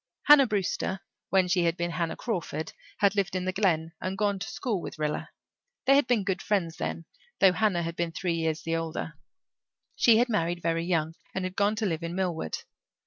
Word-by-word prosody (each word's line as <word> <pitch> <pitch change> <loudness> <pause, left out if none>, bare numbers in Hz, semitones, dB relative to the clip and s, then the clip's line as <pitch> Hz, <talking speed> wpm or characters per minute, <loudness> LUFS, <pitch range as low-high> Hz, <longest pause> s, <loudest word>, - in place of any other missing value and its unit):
Hannah 290 -2 +8
Brewster, 195 -2 -1 0.3
when 190 -1 +3
she 175 -1 +2
had 170 +1 +1
been 175 0 -1
Hannah 165 -1 -2
Crawford, 175 -7 -3 0.2
had 200 -1 +3
lived 195 -2 0
in 185 0 -1
the 185 - 0
Glen 170 -5 +1
and 190 +1 -3
gone 200 -1 +1
to 220 - -5
school 215 -8 -2
with - - -7
Rilla. 150 0 -2 0.6
They 275 - +6
had 280 -3 +4
been 235 -5 +2
good 190 -1 -1
friends 175 -6 0
then, 165 - -4 0.3
though 190 -2 +6
Hannah 195 -4 +1
had 165 0 -4
been 170 -1 -1
three 175 +1 -2
years 160 -1 -1
the 165 0 -1
older. 165 -1 -4 0.8
She 230 -2 +5
had 240 +2 +3
married 175 -6 -1
very 165 0 0
young 165 -3 0 0.2
and 190 -1 -1
had 185 0 -5
gone 205 +1 +2
to 220 0 -1
live 165 -4 -1
in 170 +1 -4
Millward. 175 - -2
180 Hz, 205 wpm, -28 LUFS, 165-200 Hz, 0.8 s, Hannah